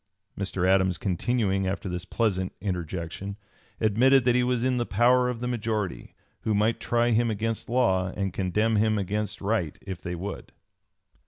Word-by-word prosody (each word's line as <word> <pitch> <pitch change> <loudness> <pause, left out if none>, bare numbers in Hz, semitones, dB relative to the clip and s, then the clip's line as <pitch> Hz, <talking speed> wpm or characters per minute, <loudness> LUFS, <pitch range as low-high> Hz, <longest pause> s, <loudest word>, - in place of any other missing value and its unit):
Mr. 95 -2 -1
Adams, 95 -1 +3
continuing 95 0 0
after 95 +1 -3
this 90 0 -4
pleasant 95 -5 0
interjection, 90 +1 -4 0.4
admitted 120 +5 +4
that 125 - +4
he 125 - +3
was 125 -1 0
in 130 -1 +1
the 120 - 0
power 125 +4 +4
of 120 -2 -4
the 125 - -2
majority, 110 -5 -3 0.2
who 110 - 0
might 110 +3 +2
try 120 0 +1
him 115 +1 +3
against 110 +2 -2
law 95 -7 +2
and 95 -3 -1
condemn 105 +4 +1
him 110 0 +2
against 105 +1 -2
right 100 -6 -1
if 95 -2 -6
they 90 0 -4
would. 95 +4 -6
105 Hz, 165 wpm, -27 LUFS, 95-120 Hz, 0.4 s, admitted